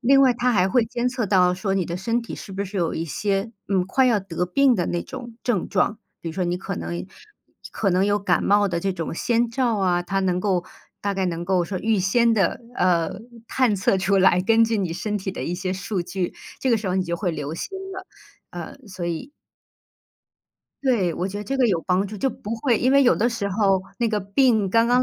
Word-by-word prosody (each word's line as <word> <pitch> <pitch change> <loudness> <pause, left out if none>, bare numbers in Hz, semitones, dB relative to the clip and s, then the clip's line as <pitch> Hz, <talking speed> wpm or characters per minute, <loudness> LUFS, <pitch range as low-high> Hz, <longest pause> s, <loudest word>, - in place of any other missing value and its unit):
另 270 +2 +5
外 260 -2 +6
它 250 +1 +1
还 190 -3 +3
会 235 +3 +3
监 240 +2 -1
测 245 -2 -2
到 180 -2 +4
说 195 +1 -2
你 185 -3 +1
的 170 - -3
身 230 +6 0
体 230 - -7
是 195 - -9
不 195 +1 -2
是 200 +1 -7
有 170 -3 0
一 165 - -2
些， 195 - -1 0.2
嗯， 190 -2 +1
快 260 +7 +2
要 220 -5 +3
得 180 -2 -3
病 260 +7 +3
的 175 -4 0
那 175 - -1
种 240 -2 -9
症 225 -8 0
状， 205 +3 +1 0.2
比 165 - -5
如 - - -5
说 185 - -1
你 175 +1 0
可 - - -5
能， 85 +2 -4 0.7
可 - - 0
能 185 +2 +3
有 205 0 +2
感 200 - +1
冒 205 0 +4
的 170 -1 -2
这 195 +1 0
种 165 -2 -4
先 235 +5 +1
兆 235 -1 0
啊， 180 -2 +1
它 195 +2 -1
能 180 -1 0
够 185 -3 0 0.4
大 200 0 0
概 190 -1 -1
能 170 -1 -3
够 185 -1 +2
说 185 +1 -4
预 220 -1 +1
先 230 +5 +3
地， 195 -6 +1 0.2
呃， 170 -3 +2 0.4
探 250 -6 +2
测 190 0 +2
出 195 +1 +2
来， 185 -1 +5
根 225 +4 +4
据 225 -1 0
你 185 -4 -1
身 210 +2 -2
体 190 0 -4
的 - - -6
一 175 - -2
些 185 0 -3
数 195 +1 -2
据， 180 +1 -3 0.3
这 260 - +1
个 230 - +4
时 205 - -4
候 185 - 0
你 190 -1 +1
就 170 - -2
会 175 +1 -1
留 150 -2 -4
心 - - -5 0.2
了， 375 0 -8 0.4
呃， - - -8
所 180 -3 -6
以 170 - -4 1.5
对， 210 -10 +2
我 180 +4 -2
觉 200 - -6
得 210 - -5
这 270 +5 -2
个 250 - +4
有 185 -6 +2
帮 185 +2 +1
助， 210 +2 -7
就 265 +6 0
不 220 +1 -6
会 235 -1 +1
因 255 - +2
为 280 +1 +6
有 250 - +5
的 235 +3 +2
时 230 -4 -3
候， 195 -2 +2 0.2
那 235 -1 +1
个 210 -1 0
病 210 0 +2
刚 230 +2 +4
刚 245 +1 +4
195 Hz, 260 characters per minute, -23 LUFS, 180-230 Hz, 1.5 s, 外